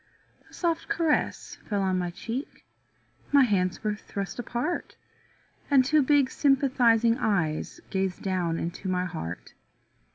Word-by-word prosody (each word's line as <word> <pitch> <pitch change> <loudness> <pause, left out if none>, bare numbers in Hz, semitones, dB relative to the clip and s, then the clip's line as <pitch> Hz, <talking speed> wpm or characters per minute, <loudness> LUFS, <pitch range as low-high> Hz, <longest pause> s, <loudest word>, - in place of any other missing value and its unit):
A - - -23
soft 335 -2 -1
caress 325 -3 0
fell 200 -2 0
on 185 -1 +1
my 175 -1 -1
cheek, 230 - -6 0.7
My 285 -1 +7
hands 185 -6 0
were 210 -1 0
thrust 200 +1 -6
apart. 245 +8 -3 0.7
And 270 -3 +5
two 305 +3 +4
big 280 -1 +3
sympathizing 245 -4 +3
eyes 170 - -1
Gazed 190 -1 -1
down 180 -4 0
into 175 +3 -4
my 180 0 0
heart. 155 - -6
215 Hz, 130 wpm, -27 LUFS, 185-270 Hz, 0.7 s, My